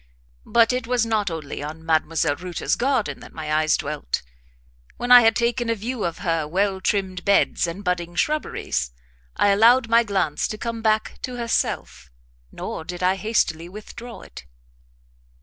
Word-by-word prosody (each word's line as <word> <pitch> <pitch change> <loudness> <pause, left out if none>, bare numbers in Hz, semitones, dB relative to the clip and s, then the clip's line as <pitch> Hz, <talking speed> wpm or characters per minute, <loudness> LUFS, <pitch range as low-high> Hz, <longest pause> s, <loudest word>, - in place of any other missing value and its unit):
But 235 +1 +4
it 250 -2 -2
was 245 -2 +2
not 215 -3 0
only 155 -4 -6
on 155 +2 -7
Mdlle. 160 -2 +1
Reuter's 180 -2 -1
garden 260 -3 0
that - - -13
my 155 -1 -3
eyes 155 0 +3
dwelt; 150 - -3 0.7
when 245 0 -2
I 245 0 +11
had 225 -1 +4
taken 240 0 0
a 230 - +2
view 225 +2 -3
of 170 -1 -3
her 165 -3 0
well 190 +3 0
trimmed 185 -2 -1
beds 200 -3 +2
and 175 +5 -6
budding 175 -2 -2
shrubberies, 300 - -1 0.5
I 205 - +4
allowed 230 +4 +5
my 230 +1 +6
glance 190 -8 0
to 215 - -5
come 230 0 -4
back 220 -1 0
to 255 - -5
herself, 230 - -2 0.4
nor - - -6
did 175 +2 -6
I 185 +1 +3
hastily 180 -5 0
withdraw 220 +4 -10
it. - - -12
200 Hz, 165 wpm, -23 LUFS, 165-230 Hz, 0.7 s, I